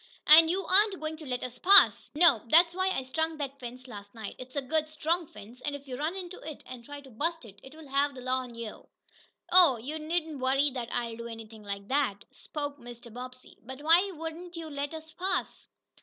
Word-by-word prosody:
"And 320 +2 +9
you 380 +3 -1
aren't 395 0 +5
going 310 0 -4
to 310 -2 -10
let 250 -1 -3
us 250 -1 -6
pass?" 400 +2 +6
"Nope! 300 -9 +5
That's 335 +3 +6
why 375 +1 0
I 320 -8 -1
strung 320 +5 -2
that 280 -1 -5
fence 250 +1 -9
last 205 -2 -11
night. 220 -2 -6
It's 255 +1 -10
a 285 - 0
good, 310 +3 -1
strong 320 +2 -1
fence, 220 +3 -13
and 290 -1 -3
if 285 0 -11
you 255 - -5
run 310 +7 -2
into 365 -1 -7
it, 310 -2 -9
and 250 -2 -9
try 290 +3 -9
to 270 -2 -15
bust 325 +5 -3
it 200 -2 -15
I'll 315 -2 -13
have 280 +1 +1
th' 255 - -9
law 255 0 0
on 250 -2 -8
ye!" 230 -2 -5 0.8
"Oh, 345 -8 +7
you 285 +8 -6
needn't 315 -1 -3
worry 270 +3 +2
that 245 -2 -5
I'll 235 -2 -3
do 235 0 -7
anything 225 -1 -10
like 200 -1 -6
that," 265 -8 0
spoke 290 -1 -6
Mr. 240 -1 -11
Bobbsey. 255 +1 -10
"But 260 +4 -10
why 340 +5 +5
won't 330 +2 -7
you 325 -2 -7
let 285 +2 -4
us 315 0 -10
pass?" 370 +4 -3
285 Hz, 220 wpm, -29 LUFS, 245-320 Hz, 0.8 s, And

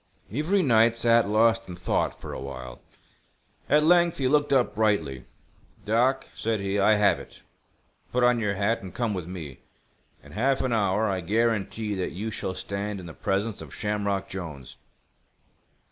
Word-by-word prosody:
Avery 165 - +1
Knight, 115 -3 +4
sat 115 -2 +3
lost 115 0 +3
in 90 - -6
thought 90 - -1
for - - -7
a - - -5
while. 65 -2 -8 0.9
At 150 +2 +4
length 170 +1 +4
he 135 - -1
looked 145 +1 +2
up 130 -3 +3
brightly. 85 - 0 0.6
"Doc," 125 +5 +2
said 110 -1 -1
he, 100 +1 -1
"I 105 +2 +5
have 105 -1 +3
it. - - -13 0.7
Put 125 0 +1
on 125 -1 +4
your 105 -2 -1
hat, 105 +4 0
and 95 - -10
come 115 -3 -1
with 90 -4 -5
me. 80 -7 -8 0.6
In - - -15
half 135 +5 +1
an 130 - 0
hour 105 0 +1
I 95 -2 -1
guarantee 110 +1 0
that 95 -4 -3
you 105 +5 -4
shall 95 -2 -4
stand 100 +1 -4
in 90 - -9
the 80 - -9
presence 100 +5 -2
of - - -10
Shamrock 100 -2 -2
Jolnes." 80 -8 -7
105 Hz, 170 wpm, -26 LUFS, 95-115 Hz, 0.9 s, I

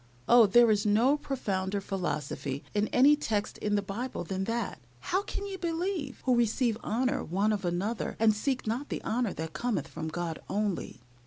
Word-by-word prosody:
Oh! 240 -3 +7
there 235 +3 +6
is 205 -1 +2
no 225 +7 +4
profounder 200 -9 -2
philosophy 150 -7 -3
in 210 0 +1
any 280 +4 +6
text 215 -8 -2
in 210 0 0
the 205 - +1
Bible 205 +1 -4
than 190 +2 -3
that 230 -1 -2 0.2
"How 370 - 0
can 405 0 -5
ye 390 -1 -5
believe 340 -4 -2
who 255 -1 +4
receive 235 0 +2
honor 255 +5 0
one 200 +5 +1
of 200 -2 -3
another, 185 +6 -2
and 220 -1 +5
seek 255 +5 -1
not 240 +7 -2
the - - -4
honor 235 -3 0
that 160 0 -5
cometh 225 - -1
from 160 0 -6
God 165 0 -3
only?" 200 - -2
215 Hz, 180 wpm, -29 LUFS, 195-255 Hz, 0.2 s, Oh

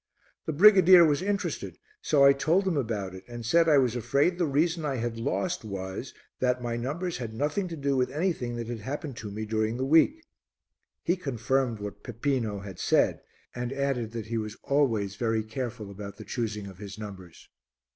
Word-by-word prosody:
The - - +1
brigadier 185 0 +8
was 150 0 +2
interested, 200 +1 -2 0.2
so 145 -3 +3
I 140 0 +8
told 170 +8 +1
him 180 - +1
about 110 -8 -2
it 95 0 -10
and 120 -1 -7
said 165 +7 +4
I 150 - +6
was 125 -3 +2
afraid 140 - +1
the 170 - +2
reason 160 +4 +1
I 140 -3 -1
had 120 -1 -3
lost 170 +6 -1
was 100 +3 -5 0.3
that 125 0 +1
my 120 -1 -3
numbers 155 +9 -3
had 115 -3 -6
nothing 150 - -1
to 170 - -6
do 140 -1 0
with 125 -1 +1
anything 150 -7 -1
that 120 0 -4
had 120 0 -5
happened 140 +4 -5
to 105 - -6
me 110 +2 -5
during 110 +1 -1
the 130 - -1
week. 165 - +4 0.8
He 175 - +2
confirmed 130 - -1
what 105 -1 -7
Peppino 115 -4 -2
had 95 -3 -9
said - - +2 0.3
and 125 0 -4
added 135 -4 -1
that 115 -2 -4
he 115 +1 -2
was 110 -1 -5
always 115 -9 +1
very 110 -1 0
careful 110 -2 -5
about 100 0 -8
the 110 - -10
choosing 110 -4 -3
of 95 -2 -11
his 100 -1 -8
numbers. 95 -5 -10
125 Hz, 195 wpm, -28 LUFS, 110-150 Hz, 0.8 s, brigadier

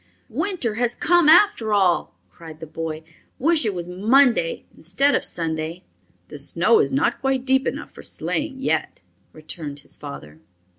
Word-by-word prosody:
"Winter 360 - -2
has 240 0 0
come 345 -2 +3
after 320 - +5
all!" 185 -4 +1 0.2
cried 160 -2 -12
the 160 - -7
boy. 160 0 -6 0.3
"Wish 310 -3 +2
it 205 - -1
was 175 -1 -5
Monday 220 0 +2
instead 270 - +1
of - - +1
Sunday." 165 +1 -4 0.5
"The - - -7
snow 450 - +3
is - - +1
not 275 +1 0
quite 270 -1 0
deep 265 0 +2
enough - - -4
for - - -12
sleighing 285 -3 -3
yet," - - -1 0.3
returned 155 -2 -8
his - - -9
father. 75 +2 -10
215 Hz, 155 wpm, -22 LUFS, -, 0.5 s, after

